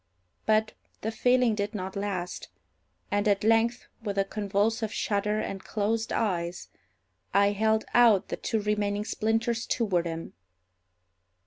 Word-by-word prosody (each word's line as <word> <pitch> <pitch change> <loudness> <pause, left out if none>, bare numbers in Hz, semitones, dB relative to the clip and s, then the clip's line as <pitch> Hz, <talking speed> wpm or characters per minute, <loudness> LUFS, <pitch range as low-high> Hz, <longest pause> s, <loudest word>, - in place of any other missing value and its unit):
But 220 0 +3 0.3
the 220 - -2
feeling 245 +1 +3
did 210 +1 -2
not 190 -1 -4
last; 190 -3 -3 0.6
and, 205 +1 +1
at 200 -1 +2
length, 225 +2 +2 0.2
with 205 -3 -4
a 195 - +3
convulsive 210 +2 0
shudder 210 +1 0
and 195 -2 -4
closed 220 +2 -1
eyes, 175 -5 -1 0.7
I 200 0 +5
held 220 +1 +1
out 225 -5 +5
the - - -3
two 220 -2 -1
remaining 210 0 0
splinters 225 +2 0
toward 185 -8 +1
him. 165 0 -6
210 Hz, 130 wpm, -28 LUFS, 200-225 Hz, 0.7 s, I